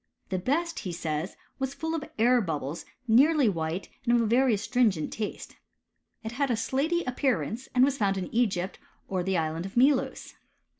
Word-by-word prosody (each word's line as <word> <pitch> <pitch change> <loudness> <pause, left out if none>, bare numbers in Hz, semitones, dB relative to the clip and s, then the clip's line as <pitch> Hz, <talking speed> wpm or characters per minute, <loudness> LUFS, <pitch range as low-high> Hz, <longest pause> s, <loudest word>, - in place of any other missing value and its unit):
The 185 - -1
best, 330 - -1
he. 185 - -4
says, 165 0 -3 0.2
was 270 +1 -2
full 320 +3 -3
of 325 -3 -2
air 240 +2 +4
bubbles, 155 -3 -4 0.2
nearly 275 +4 +5
white, 165 -1 -2 0.2
and 240 -1 +3
of 235 - +4
a - - +1
very 240 +1 +3
astrin 245 +3 +2
gent 160 -6 -4
taste. 215 -2 -5 0.7
It 220 - -4
had 275 +3 0
a 240 - +2
slaty 310 +9 0
appearance, 250 -1 -1
and 250 +1 +6
was 275 0 -1
found 195 -2 +1
iu 225 +6 +1
£g3rpt 185 -1 -3 0.3
or 185 -2 -1
the 190 +1 0
Island 160 +2 -2
of 195 - -10
Melos. 265 +2 +2
230 Hz, 185 wpm, -28 LUFS, 185-265 Hz, 0.7 s, and